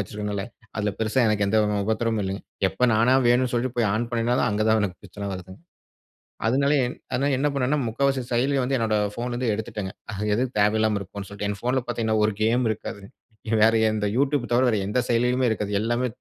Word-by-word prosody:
வச்சிருக்கிறனாலே. 105 +1 -4 0.3
அதுல 105 -1 0
பெருசா 110 +4 +1
எனக்கு 105 -1 +1
எந்த 110 +2 +3 0.3
உபத்திரமும் 110 0 0
இல்லங்க.எப்ப 95 0 -4
நானா 115 +4 +4
வேணுனு 125 +1 +3
சொல்ட்டு 120 +1 -1
போய் 115 -3 +3
ஆன் 120 +2 -1
பண்ணினாலும், 120 +2 +1
அங்க 105 +1 0
தா 110 - +5
எனக்கு 90 -3 -3
பிரச்சன 100 +1 -6
வருதுங்க. 95 +3 -10 0.9
அதனா, 135 +5 +2 0.5
அதனால 140 +1 +1
என்ன 145 +2 +1
பண்ணுவேன்னா, 140 +2 +1
முக்காவாசி 135 +3 0
செயலிய 135 +3 +2
வந்து 135 +2 0
என்னுடைய 110 -3 +1
போன்ல 120 +1 -3
இருந்து 120 -2 0
எடுத்துட்டேங்க. 105 -3 -5 0.2
அது 105 +1 -3
எதுக்கு 125 +2 -2
தேவயில்லாம 105 0 +2
இருக்குனு 100 +1 -8
சொல்ட்டு. 100 0 -4
என் 100 -1 -4
போன்ல 125 +1 +1
பார்த்தீங்கனா, 110 -2 0
ஒரு 110 - 0
கேம் 120 +3 +2
இருக்காது. 110 -1 -6 0.6
வேற 115 +1 +5 0.2
எந்த 105 -1 -1
Youtube 140 -2 +1
தவிர, 125 +2 +4
வேற 110 - +1
எந்த 125 +5 0
செயலியிலுமே 125 +2 +2
இருக்காது. 105 -2 -2
எல்லாமே 120 +3 0
115 Hz, 180 wpm, -24 LUFS, 105-125 Hz, 0.9 s, தா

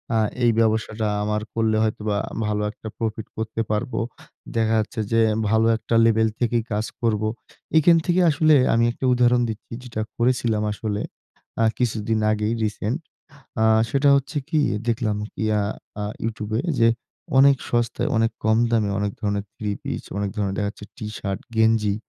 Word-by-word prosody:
আ - - +3 0.3
এই 120 - +5
ব্যবসাটা 110 -1 +1 0.2
আমার 105 0 -1
কল্লে 110 -1 +1
হয়তোবা 105 -1 -1 0.3
ভালো 105 0 -1
একটা 110 - -11
প্রফিট 110 -1 -3
করতে 110 0 -2
পারবো। 110 +5 -1 0.6
দেখা 110 -1 +2
যাচ্ছে 110 +1 -3
যে 115 - +3 0.3
ভালো 110 +1 +3
একটা 115 - -2
লেভেল 110 -1 +4
থেকেই 120 -1 +1
কাজ 105 +1 0 0.2
করবো।" 110 -2 +1 0.5
এইখান 165 +2 +6
থেকে 180 +1 +3
আসলে 155 +1 +4 0.2
আমি 115 +1 +3
একটা 125 - -5
উদাহরণ 120 0 +4
দিচ্ছি 110 +1 -7
যেটা 115 -3 -4 0.2
করেছিলাম 120 -3 +1
আসলে, 105 0 -3 0.6
আ - - +4
কিছুদিন 110 -2 0
আগেই 105 +1 0
রিসেন্ট। 110 +5 -2 0.6
আ - - +4 0.2
সেটা 140 +4 +2
হচ্ছে 140 +3 -3
কি? 155 -2 +2 0.3
দেখলাম 115 -3 0 0.3
ইয়া 110 -1 +2 0.4
আ - - -2 0.2
YouTube 110 -1 -4
এ - - -4 0.2
যে 115 - +6 0.5
অনেক 140 0 +7
সস্তায়, 120 +4 0
অনেক 115 0 +2
কম 110 0 +3
দামে, 110 -3 +2
অনেক 105 -1 -1
ধরনের 100 -1 -1
থ্রি-পিস, 105 -2 -4
অনেক 100 -1 -1
ধরনের 100 -2 -1
দেখা 100 -1 0
যাচ্ছে 105 - -12
টি-শার্ট, 105 -4 -4 0.2
গেঞ্জি 110 -2 +3
110 Hz, 160 wpm, -23 LUFS, 105-120 Hz, 0.6 s, অনেক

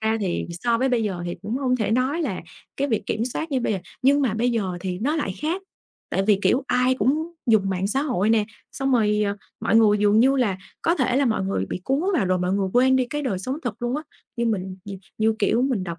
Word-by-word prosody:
ra 220 0 +1
thì 185 -4 -1
so 230 +7 0
với 260 +2 +2
bây 245 -3 +1
giờ 190 -5 -3
thì 175 - -3
cũng 215 +5 -2
không 255 -2 +1
thể 220 -4 -1
nói 260 +8 +1
là 210 - -2 0.4
cái 280 +1 0
việc 220 -5 0
kiểm 225 +2 -1
soát 315 +6 -4
như 265 -2 +1
bây 235 - 0
giờ. 195 - -1 0.2
Nhưng 280 +2 +4
mà 235 -6 +1
bây 240 +3 +1
giờ 230 -4 0 0.2
thì 180 -1 -3
nó 285 - 0
lại 240 -12 -2
khác, 345 +5 -1 0.5
tại 195 - +1
vì, 210 -2 +4
kiểu, 260 +3 +3
ai 250 0 +2
cũng 305 +6 0
dùng 215 -4 +3
mạng 190 0 -1
xã 265 +7 0
hội 230 -8 +1
nè, 220 -2 +3 0.3
xong 270 0 -1
rồi, 210 -3 +3
ờ, 200 0 -2 0.2
mọi - - +2
người 210 -2 +5
dường 205 +1 +4
như 270 +3 +4
là 210 -8 +1 0.2
có 335 - +3
thể 255 -3 +1
là 275 - +3
mọi 220 -4 0
người 145 - -1
bị 180 - -5
cuốn 270 +5 +1
vào 255 - +2
rồi 185 0 +1
mọi 180 +1 0
người 195 -1 0
quên 260 +1 +4
đi 260 - +2
cái 295 0 -2
đời 210 -9 -1
sống 255 +9 -3
thật 240 -2 -5
luôn 240 +3 0
á, 305 - -4 0.3
như 235 - 0
mình 190 -4 -2
nhì 200 -1 -7 0.2
như 220 0 +2
kiểu 225 +4 +2
mình 250 -8 0
đọc 170 -2 -6
230 Hz, 265 wpm, -23 LUFS, 200-260 Hz, 0.5 s, người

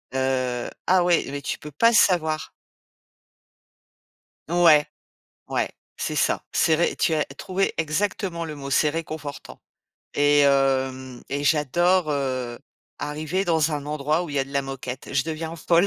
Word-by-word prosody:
Heu, 130 -2 -1 0.2
ah, 185 -1 +4
ouais, 175 -2 +3
mais 140 +1 -5
tu - - -3
peux 150 - -9
pas 230 - +4
savoir. 160 -7 +2 2.0
Ouais, 165 -4 +5 0.7
ouais, - - 0 0.3
c'est - - -3
ça. - - +1
C'est 160 - +3
ré 170 - +1
tu 165 - +1
as 155 -1 +1
trouvé 185 +8 -2
exactement 170 +2 -1
le 155 -2 -6
mot, 140 -1 -7
c'est 150 +2 +3
réconfortant 150 -3 -6 0.5
et 145 0 +4
hem 130 -2 +1
et 145 +1 -2
j'adore, 160 +4 +2
heu, 130 -4 -2 0.4
arriver 155 +6 -2
dans 160 -2 +2
un 145 -1 -3
endroit 150 +3 0
où 175 - -6
il - - -6
y - - +3
a 135 - +1
de 135 - -13
la 140 - +2
moquette. 135 -1 -7
Je 135 - +3
deviens 160 +1 -4
folle, 170 +3 +3
150 Hz, 155 wpm, -24 LUFS, 135-165 Hz, 2.0 s, Ouais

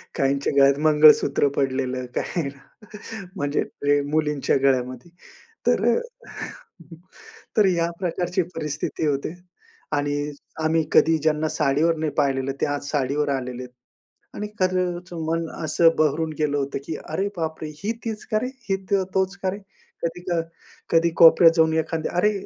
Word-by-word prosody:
काहींच्या 140 +1 0
गळ्यात 140 0 +5
मंगळसूत्र 150 -2 +5
पडलेलं, 130 -1 -1
काही 165 -6 -2 0.9
म्हणजे 145 -5 0 0.2
प्रे 145 0 +3
मुलींच्या 150 -2 +1
गळ्यामध्ये. 130 +1 0 0.6
तर - - +3
अ, - - +1 1.6
तर 210 - +6
या 170 -2 +1
प्रकारची 180 0 -1
परिस्थिती 150 0 -3
होते 140 +2 -1 0.6
आणि 145 0 -1 0.5
आम्ही 160 +1 +2
कधी 160 0 +5
ज्यांना 155 0 +1
साडीवर 155 +3 +2
नाही 155 -1 -1
पाहिलेलं 135 -1 +1
ते - - +3
आज 145 -1 -3
साडीवर 145 +1 0
आलेलेत. 125 -2 -3 0.7
आणि, 210 - -4
खरंच 180 -1 -1
मन 165 0 -1 0.2
असं 160 +2 +4
बहरून 155 +1 +1
गेलं 145 -1 +1
होतं, 140 -1 -2
की 160 - -4
"अरे 190 +6 -1
बापरे! 160 -1 -3 0.2
ही 210 - 0
तीच 220 -2 -4
का 215 - +3
रे? 250 - -2 0.2
ही 195 - +3 0.2
तो, 195 -1 +3
तोच 190 0 +1
का 190 - +2
रे?" 200 - -6 0.4
कधी 170 +1 -2
क - - +1 0.6
कधी 170 0 +4
कोपऱ्यात 165 0 +8
जाऊन 160 -1 +3
एखाद्या 160 0 -2
"अरे 210 +4 +4
155 Hz, 140 wpm, -23 LUFS, 140-170 Hz, 1.6 s, कोपऱ्यात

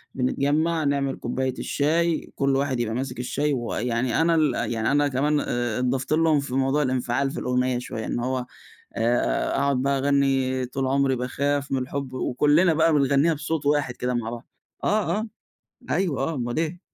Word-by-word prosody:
بنتجمَّع 150 +5 +1
نعمل 140 -1 0
كوباية 130 -1 -2
الشاي، 165 +3 0
كل 140 -1 +1
واحد 135 -2 0
يبقى 115 -1 -1
ماسك 130 -1 -4
الشاي 145 +4 -1
ويعني 120 +1 -1
أنا 165 0 +3
ال 150 -5 +3 0.2
يعني 110 +2 0
أنا 145 0 +3
كمان 145 +3 +1
ا 120 -3 -2
اتضفت 125 +2 -1
لهم 155 -1 +3
في 140 -2 -5
موضوع 135 +2 +2
الانفعال 130 0 0
في - - -5
الأغنية 125 0 0
شويّة، 125 -3 -5
إن - - -2
هو 125 0 -2 0.5
آآ، 120 +2 +1
أقعد 140 -2 +1
بقى 140 0 +1
اغني 135 -2 +1
طول 130 +1 -3
عمري 135 0 +2
باخاف 140 +3 -1
من 135 - +1
الحب، 130 +1 -4
وكلنا 150 +7 +3
بقى 160 +1 +3
بنغنيها 140 +3 +3
بصوت 150 0 -3
واحد 145 -4 +1
كده 125 0 -2
مع 115 -2 -2
بعض، 120 +1 -8 0.4
آه 210 0 +1
آه، 220 - -4 0.6
أيوه، 170 -8 0
آه 165 +3 -1
اُمّال 120 -2 -3
إيه. 165 +2 -2
135 Hz, 175 wpm, -24 LUFS, 125-150 Hz, 0.6 s, أنا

